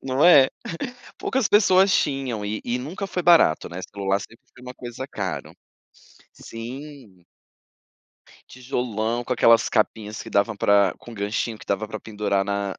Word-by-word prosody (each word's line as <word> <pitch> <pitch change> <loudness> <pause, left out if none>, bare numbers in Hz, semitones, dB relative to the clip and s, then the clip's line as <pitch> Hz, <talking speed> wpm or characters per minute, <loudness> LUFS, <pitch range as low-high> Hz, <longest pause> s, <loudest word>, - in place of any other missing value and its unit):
não 135 +2 +1
é, 145 -7 +8 0.7
poucas 260 -5 -1
pessoas 190 -2 +5
tinham 135 - 0
e 105 +1 -3
e 120 +1 -2
nunca 170 +10 -5
foi 180 -2 -3
barato, 170 - +4
né, 85 +2 -6
celular 100 -1 -1
sempre 115 - -11 0.2
foi - - -16
uma 125 0 -9
coisa 125 +1 -7
caro, 95 -3 -5 0.8
sim. 120 - -10 1.2
Tijolão, 120 -3 -3
com 125 - -3
aquelas 115 -1 +5
capinhas 110 0 -1
que 115 - -10
dava 100 0 +1
pra 100 -2 +3
com 120 - -12
ganchinho 105 +1 -3
que - - -14
dava 100 +2 -1
para 110 0 -7
pendurar 105 -2 -1
na 100 -1 -2
115 Hz, 150 wpm, -23 LUFS, 100-135 Hz, 1.2 s, é